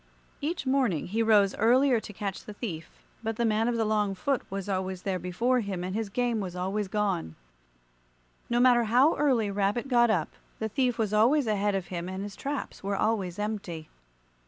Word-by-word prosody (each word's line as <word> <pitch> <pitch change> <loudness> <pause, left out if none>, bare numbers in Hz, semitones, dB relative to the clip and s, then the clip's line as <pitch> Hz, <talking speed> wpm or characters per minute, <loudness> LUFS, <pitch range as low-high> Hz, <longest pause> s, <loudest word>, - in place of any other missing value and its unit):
Each 310 +1 -2
morning 260 - +1
he 220 +4 0
rose 210 -3 +4
earlier 250 +2 +4
to 215 - -9
catch 200 -2 -5
the 210 - -9
thief, 170 -9 -5 0.3
but 225 -1 -2
the 235 - 0
man 220 +1 +2
of 240 -1 0
the 225 - +1
long 210 -2 +1
foot 255 +7 0
was 195 0 -4
always 190 -1 -2
there 190 -2 -1
before 230 +9 +1
him, 195 -5 -3
and 185 +1 -4
his 220 -2 -2
game 240 +1 0
was 185 -3 -5
always 190 +3 -2
gone. 195 - -1 1.1
No 240 0 +2
matter 245 -1 +5
how 250 +8 +4
early 245 -8 +1
Rabbit 205 +5 0
got 240 -2 +4
up, 220 - +1 0.3
the 220 - -3
thief 250 +1 0
was 215 -3 -1
always 245 +7 +4
ahead 205 -2 +1
of 190 -2 -3
him 175 0 -4
and 190 +1 -4
his 205 -1 -7
traps 280 0 -5
were 200 +1 -1
always 195 -4 0
empty. 205 -7 -4
210 Hz, 195 wpm, -28 LUFS, 195-240 Hz, 1.1 s, matter